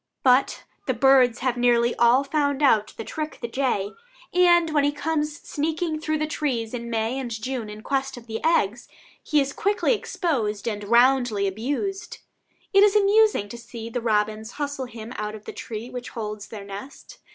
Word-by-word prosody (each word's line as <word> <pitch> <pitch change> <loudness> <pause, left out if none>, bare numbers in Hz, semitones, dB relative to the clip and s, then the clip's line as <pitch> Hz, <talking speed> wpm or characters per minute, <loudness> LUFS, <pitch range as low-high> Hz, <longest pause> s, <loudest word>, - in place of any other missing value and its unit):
But 260 0 +3 0.2
the - - +1
birds 260 -3 +4
have 250 -1 +1
nearly 240 -1 +3
all 240 +3 +5
found 285 0 0
out 215 -6 +3
the - - -4
trick 310 +6 -5
the 235 - -4
jay, 230 -5 -1 0.4
and 345 -2 +5
when 295 -2 +2
he 290 - +3
comes 300 0 -2
sneaking 315 +1 -2
through 310 0 -1
the 305 - 0
trees 260 -7 -2
in 235 -1 -5
May 225 +3 -1
and 255 -2 -4
June 230 0 -4
in 210 +1 -9
quest 270 -1 -2
of 235 - -11 0.2
eggs, 240 -8 +1 0.3
he 300 - +2
is 275 0 0
quickly 410 +4 +1
exposed 240 - -2
and 210 -2 -3
roundly 240 -2 +3
abused. 280 - -3 0.6
It 395 - +7
is 415 0 +5
amusing 420 - +4
to 235 - -8
see 230 -1 -8
the 245 - -2
robins 215 0 0
hustle 285 -2 -3
him 230 -2 -9
out 210 0 -4
of 215 - -12
the - - -7
tree 230 +2 -7
which 250 -1 -6
holds 210 -2 -6
their 205 -3 -8
nest. 200 +8 -10
250 Hz, 180 wpm, -24 LUFS, 225-295 Hz, 0.6 s, It